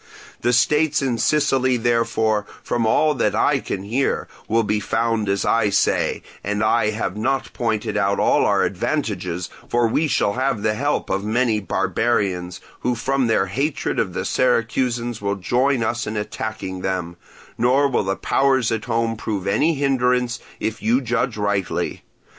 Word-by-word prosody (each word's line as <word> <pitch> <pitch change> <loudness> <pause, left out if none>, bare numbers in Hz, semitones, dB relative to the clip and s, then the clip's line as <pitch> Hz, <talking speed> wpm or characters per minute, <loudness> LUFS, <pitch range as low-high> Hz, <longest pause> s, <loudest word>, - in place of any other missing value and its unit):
The 120 - +2
states 150 +4 +2
in 125 -4 -1
Sicily, 130 -3 +2
therefore, 115 -3 +1 0.2
from 115 -2 0
all 155 +7 +3
that 130 - 0
I - - +3
can 95 - -4
hear, 120 +7 -1 0.2
will 115 +1 +2
be 105 0 0
found 110 -1 0
as 100 0 0
I 115 -2 +2
say, 100 - +1 0.2
and 105 +1 -1
I 110 0 +3
have 105 -3 -3
not 130 +5 -1
pointed 110 -2 -1
out 100 -1 +1
all - - +3
our - - +3
advantages, 90 - -2 0.2
for 120 -1 +2
we 155 +8 +1
shall 105 -7 +1
have 130 -4 -1
the 105 - +2
help 145 +6 -1
of 95 +1 0
many 110 0 +1
barbarians, 95 -3 -1 0.2
who 125 0 0
from 135 +2 0
their 110 -4 +2
hatred 135 +10 -2
of - - -1
the - - -3
Syracusans 120 -1 0
will 100 0 -1
join 125 +6 +1
us 120 +2 -2
in 105 +1 -3
attacking 105 -3 -4
them; 90 -2 -3 0.4
nor 130 +4 +4
will 130 -5 0
the 95 0 0
powers 130 -1 +1
at 110 -1 -2
home 115 -1 0
prove 105 -3 -4
any 155 +11 +2
hindrance, 125 -3 +1 0.2
if 110 0 -3
you 115 +4 +3
judge 125 -1 -1
rightly. 100 -2 -1
115 Hz, 165 wpm, -21 LUFS, 105-125 Hz, 0.4 s, nor